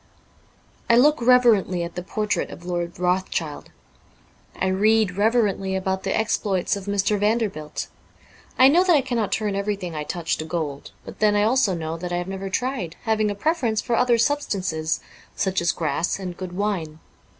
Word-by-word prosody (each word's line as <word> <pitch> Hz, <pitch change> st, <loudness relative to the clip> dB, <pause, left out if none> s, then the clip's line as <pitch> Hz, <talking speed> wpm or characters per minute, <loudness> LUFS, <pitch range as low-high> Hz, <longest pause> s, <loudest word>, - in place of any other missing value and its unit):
I 235 Hz, -, +6 dB
look 295 Hz, +2 st, +4 dB
reverently 230 Hz, -8 st, +4 dB
at 170 Hz, -, -6 dB
the 180 Hz, -, -4 dB
portrait 210 Hz, +2 st, -2 dB
of 175 Hz, -, -11 dB
Lord 175 Hz, -1 st, -3 dB
Rothschild; 180 Hz, -4 st, -1 dB, 0.9 s
I -, -, +1 dB
read 205 Hz, +1 st, +2 dB
reverently 205 Hz, -3 st, +1 dB
about 190 Hz, 0 st, -1 dB
the 195 Hz, -, -1 dB
exploits 205 Hz, -4 st, 0 dB
of 200 Hz, -1 st, -7 dB
Mr. 200 Hz, 0 st, 0 dB
Vander 215 Hz, +1 st, +1 dB
bilt. 155 Hz, -3 st, -6 dB, 0.7 s
I 260 Hz, -, +8 dB
know 335 Hz, +6 st, +5 dB
that 360 Hz, -3 st, +4 dB
I 285 Hz, -, +4 dB
cannot 240 Hz, -5 st, -2 dB
turn 210 Hz, -2 st, -1 dB
everything 200 Hz, -3 st, -3 dB
I 150 Hz, -1 st, -3 dB
touch 165 Hz, +2 st, -2 dB
to 155 Hz, -, -5 dB
gold; 160 Hz, -4 st, -4 dB
but -, -, -10 dB
then 210 Hz, -1 st, +3 dB
I 205 Hz, -, +3 dB
also 220 Hz, -4 st, +2 dB
know 160 Hz, 0 st, -4 dB
that 175 Hz, +1 st, -6 dB
I 175 Hz, -, 0 dB
have 175 Hz, 0 st, -3 dB
never 195 Hz, 0 st, -5 dB
tried, 235 Hz, -6 st, -2 dB
having 220 Hz, -2 st, +1 dB
a 205 Hz, -, -3 dB
preference 240 Hz, -3 st, 0 dB
for 240 Hz, +1 st, -1 dB
other 245 Hz, 0 st, +3 dB
sub 290 Hz, +6 st, +2 dB
stances 160 Hz, -, -2 dB, 0.2 s
— -, -, -23 dB
such 190 Hz, -2 st, 0 dB
as 170 Hz, -, +2 dB
grass 160 Hz, +1 st, -1 dB
and 185 Hz, -2 st, -6 dB
good 185 Hz, 0 st, -7 dB
wine. 180 Hz, -6 st, -2 dB
195 Hz, 185 wpm, -23 LUFS, 175-220 Hz, 0.9 s, I